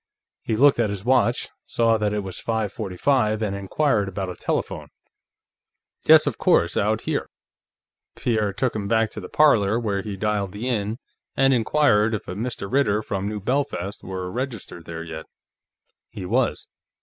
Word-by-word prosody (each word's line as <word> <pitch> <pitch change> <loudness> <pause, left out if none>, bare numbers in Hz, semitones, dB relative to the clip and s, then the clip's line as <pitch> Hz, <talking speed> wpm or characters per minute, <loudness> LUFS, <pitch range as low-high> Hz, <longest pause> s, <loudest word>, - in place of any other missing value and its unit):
He 110 - -1
looked 140 +2 +5
at 115 -3 +2
his 100 0 -5
watch, 125 -1 +2 0.2
saw 115 -1 +2
that 105 -1 0
it 105 -1 -2
was 95 -1 -6
five 110 -3 -2
forty 95 -6 -5
five, 110 -4 +2
and 100 -2 -1
inquired 100 +1 0
about 95 -1 -4
a - - -8
telephone. - - -3 1.2
"Yes, - - +7
of - - -2
course; - - +3
out - - +1
here." - - -2 0.9
Pierre 110 -4 0
took 125 +5 -1
him 100 -2 -3
back 110 0 +2
to - - -6
the 90 - -8
parlor, 115 -8 +4
where 100 -4 -1
he 100 -1 -6
dialed 100 -2 -1
the 110 +5 -4
Inn 110 -2 -1 0.4
and 135 0 +4
inquired 115 -3 +3
if 105 - -7
a - - -4
Mr. 115 +1 -4
Ritter, 110 -6 +2
from 100 0 -3
New 105 0 -4
Belfast, 105 -4 -2
were 95 -1 -5
registered 115 - -5
there 85 0 -6
yet. 80 -1 -8 0.8
He 95 - -7
was. 120 +6 0
105 Hz, 175 wpm, -23 LUFS, 100-120 Hz, 1.2 s, Yes